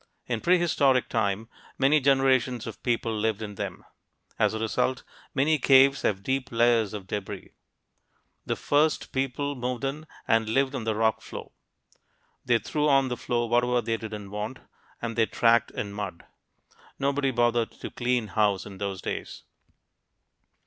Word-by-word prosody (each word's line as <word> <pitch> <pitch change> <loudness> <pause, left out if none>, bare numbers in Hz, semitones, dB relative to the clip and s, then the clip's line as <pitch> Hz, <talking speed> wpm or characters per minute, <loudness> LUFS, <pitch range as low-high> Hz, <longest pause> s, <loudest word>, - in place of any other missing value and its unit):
In 120 -3 -2
prehistoric 155 -7 +3
time, 110 -1 0 0.3
many 140 +3 +4
generations 130 -3 +2
of 115 - -8
people 115 -2 0
lived 110 0 -1
in 105 -1 -6
them. - - -6 0.5
As - - +2
a - - -3
result, 115 +3 0 0.3
many 150 +3 +3
caves 135 +1 +5
have 100 -2 0
deep 130 +2 -2
layers 115 -2 +3
of 100 -3 -7
debris. 100 0 -6 0.9
The - - -2
first 150 +2 +1
people 135 +2 -1
moved 125 -1 -3
in 145 +3 -3 0.2
and 110 -1 +2
lived 135 +4 +1
on 125 -5 -4
the 110 -1 0
rock 110 0 +1
floor. - - -9 0.9
They 120 -2 +3
threw 150 +7 -1
on 135 -2 +4
the 125 - -2
floor 120 -1 -1
whatever 120 +1 +2
they 115 -1 -1
didn't 105 -3 -7
want, 105 +5 -4 0.5
and 115 -1 -3
they 115 -1 +3
tracked 115 0 +3
in 100 -1 -5
mud; 105 -4 -6 0.7
nobody 140 0 +1
bothered 120 -2 +1
to - - -8
clean 120 -3 -1
house 105 -3 +1
in 95 -2 -10
those 100 -2 -4
days. - - -5
120 Hz, 155 wpm, -27 LUFS, 110-135 Hz, 0.9 s, caves